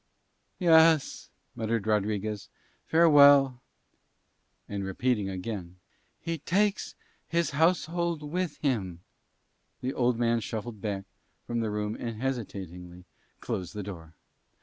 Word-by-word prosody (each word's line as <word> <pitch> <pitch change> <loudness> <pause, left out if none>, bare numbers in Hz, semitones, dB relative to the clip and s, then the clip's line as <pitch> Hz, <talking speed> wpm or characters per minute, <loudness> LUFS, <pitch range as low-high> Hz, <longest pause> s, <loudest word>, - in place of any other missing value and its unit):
"Yes," 160 -4 +4 0.2
muttered 110 -1 -2
Rodriguez. 105 -1 -1 0.4
"Farewell." 145 -5 +6 1.1
And 100 -1 -4
repeating 105 +1 0
again, 95 -2 -5 0.4
"He 165 -1 -4
takes 200 +6 0 0.3
his 170 0 0
household 165 +1 +1
with 170 +2 -3
him," 95 - -2 0.8
the 130 +2 -2
old 125 -2 +1
man 115 0 +2
shuffled 110 -1 -6
back 100 -2 -3 0.4
from 120 0 -2
the 110 -1 -1
room 105 +1 -2
and 115 -2 -5
hesitatingly 90 -8 -5 0.4
closed 90 +1 -4
the 105 - -4
door. 85 -5 -9
115 Hz, 105 wpm, -28 LUFS, 100-150 Hz, 1.1 s, Farewell